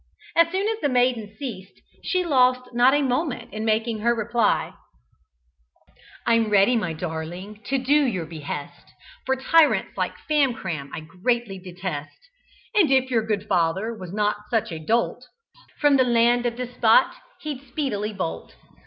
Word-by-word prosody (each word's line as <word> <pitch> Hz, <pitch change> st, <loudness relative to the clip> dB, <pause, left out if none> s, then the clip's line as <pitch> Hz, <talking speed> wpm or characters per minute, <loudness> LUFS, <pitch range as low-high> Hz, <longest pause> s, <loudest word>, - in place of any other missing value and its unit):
As 335 Hz, 0 st, +5 dB
soon 385 Hz, +3 st, 0 dB
as 445 Hz, 0 st, -1 dB
the 290 Hz, -, +1 dB
maiden 245 Hz, -5 st, +1 dB
ceased, 200 Hz, -9 st, -7 dB, 0.2 s
she 365 Hz, -1 st, 0 dB
lost 255 Hz, -4 st, +2 dB
not 245 Hz, +3 st, +5 dB
a 290 Hz, -, +2 dB
moment 255 Hz, -2 st, -2 dB
in 215 Hz, 0 st, -4 dB
making 220 Hz, 0 st, 0 dB
her 235 Hz, +2 st, +2 dB
reply: 230 Hz, 0 st, 0 dB, 1.5 s
"I'm 230 Hz, -2 st, +3 dB
ready, 205 Hz, +4 st, +4 dB
my 180 Hz, -8 st, -1 dB
darling, 175 Hz, +5 st, -6 dB
to 270 Hz, -, 0 dB
do 285 Hz, +3 st, +3 dB
your 185 Hz, -10 st, -2 dB
behest, 150 Hz, -2 st, -7 dB, 0.4 s
For 265 Hz, -, +2 dB
tyrants 305 Hz, +4 st, +3 dB
like -, -, -1 dB
Famcram 225 Hz, -, 0 dB
I -, -, -6 dB
greatly 195 Hz, +5 st, -2 dB
detest, 180 Hz, -5 st, -6 dB, 0.6 s
And 380 Hz, -8 st, +4 dB
if 260 Hz, -1 st, +2 dB
your 230 Hz, -2 st, +3 dB
good 210 Hz, -2 st, -2 dB
father 185 Hz, +5 st, 0 dB
was 185 Hz, -5 st, -9 dB
not 210 Hz, 0 st, -1 dB
such 225 Hz, -6 st, 0 dB
a 160 Hz, -, -5 dB
dolt, 230 Hz, +8 st, 0 dB, 0.6 s
From 290 Hz, -2 st, +4 dB
the 260 Hz, -, +5 dB
land 240 Hz, 0 st, +3 dB
of 235 Hz, 0 st, -4 dB
the 250 Hz, -, -2 dB
despot 250 Hz, -, +3 dB, 0.3 s
he'd 295 Hz, -4 st, -5 dB
speedily 245 Hz, -6 st, -2 dB
bolt. 80 Hz, -, -5 dB
230 Hz, 155 wpm, -24 LUFS, 195-260 Hz, 1.5 s, As